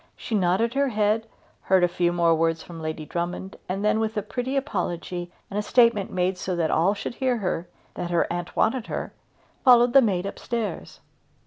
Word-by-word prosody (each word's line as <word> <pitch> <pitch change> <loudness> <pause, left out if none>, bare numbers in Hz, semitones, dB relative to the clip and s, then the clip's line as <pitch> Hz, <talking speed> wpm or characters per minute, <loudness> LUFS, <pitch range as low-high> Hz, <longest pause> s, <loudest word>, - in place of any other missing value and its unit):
She - - -6
nodded 200 +4 +2
her 280 0 +2
head, 215 -1 +1 0.3
heard 190 -1 +3
a - - +6
few 175 0 0
more 170 -1 +3
words 165 0 +1
from 165 -2 -10
Lady 155 -1 -4
Drummond, 175 +4 -4
and 195 +3 -2
then, 215 +1 +3
with 220 0 -2
a 210 - 0
pretty 255 +5 -3
apology 180 - -3 0.2
and 205 - -3
a - - +1
statement 230 -2 +3
made 180 0 0
so 185 0 -2
that 165 -2 0
all 185 +6 +3
should 205 - -5
hear 255 -1 0
her, 180 -4 -2 0.3
that 175 - -4
her 170 -1 +2
aunt 175 0 -5
wanted 230 +1 +1
her, - - -4 0.5
followed 245 -2 +6
the 275 - +8
maid 195 -6 0
up 200 - -6
stairs. 230 -3 -4
195 Hz, 200 wpm, -25 LUFS, 175-230 Hz, 0.5 s, the